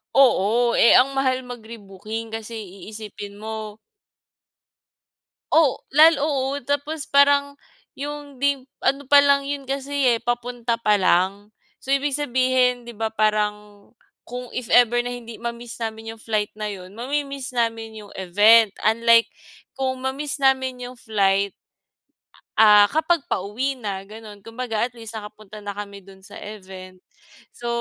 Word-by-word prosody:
Oo, 240 -2 +4
eh 235 - +7
ang 270 +2 +5
mahal 260 -1 0
mag-rebooking, 225 -2 -8
kasi 225 +1 -6
iisipin 205 0 -9
mo 215 0 -6 1.8
O 315 -5 +4 0.2
lal 315 +1 +7
oo, 280 -2 -1
tapos 285 +2 -2
parang 280 -1 +4 0.4
yung 285 -1 -7
'di 280 -2 +1 0.2
ano 280 +1 +1
palang 280 0 +5
yun 285 -1 -3
kasi 275 -3 +1
eh, - - -14
papunta 240 0 -2
pa 210 -2 +3
lang. 195 +3 +1 0.3
So, 270 - +1
ibig 275 0 +1
sabihin, 255 -2 +1
di 235 -2 -11
ba 220 0 -2
parang, 210 -1 -1 0.3
kung 250 0 -7
if 250 -2 -3
ever 240 0 +5
na 245 - -3
hindi 235 -2 -9
ma-miss 235 0 -6
namin 225 0 -6
yung - - -18
flight 215 -2 -1
na 215 - -4
yun, 195 -1 -8
ma-mimiss 275 +1 -3
namin 225 -2 -2
yung 205 - -13
event. 205 +4 +5
Unlike, 230 +1 +4 0.5
kung 260 -1 -2
ma-miss 275 +2 -3
namin 260 -2 +1
yung 250 0 -8
flight 200 -3 +1 1.1
ah 210 -1 +7
kapag 320 +6 +1
pauwi 230 +9 -2
na 200 -5 -6
ganun. 215 -1 -11
Kumbaga 230 +1 -3
at 245 - -23
least 225 -2 -9
nakapunta 215 -1 -10
na 205 -1 -7
kami 200 -1 -7
dun 190 0 -17
sa 205 - -11
event. 185 -3 -11 0.5
So 240 - -8
230 Hz, 140 wpm, -22 LUFS, 210-265 Hz, 1.8 s, eh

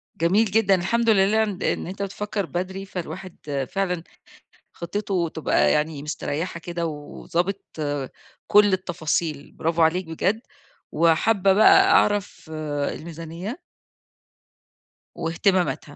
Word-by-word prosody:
جميل 185 +7 +3
جدًا، 210 -1 +3
الحمد 230 +6 +1
لله 210 +1 +4
إن 205 -4 -3
د - - -6
إن - - -1
أنت 195 +2 -6
بتفكّر 200 0 -3
بدري، 185 +3 -4
فالواحد 170 -7 -5
فعلًا 180 -4 -1 0.7
خطّطته 180 -1 -2
تبقى 160 - +2
يعني 150 -1 0
مستريّحة 155 +3 -3
كده 170 0 -4
وضابط 170 +5 -3 0.9
كل 205 -1 +5
التفاصيل. 165 -5 -2
برافو 165 +1 -1
عليك 175 +3 +3
بجد 185 +7 -1 0.5
وحابّة 190 +5 +3
بقى 215 +2 +6
أعرف 205 -5 +2 0.4
الميزانية 170 - -7 1.6
واهتمامتها. 175 -3 0
180 Hz, 105 wpm, -24 LUFS, 165-200 Hz, 1.6 s, بقى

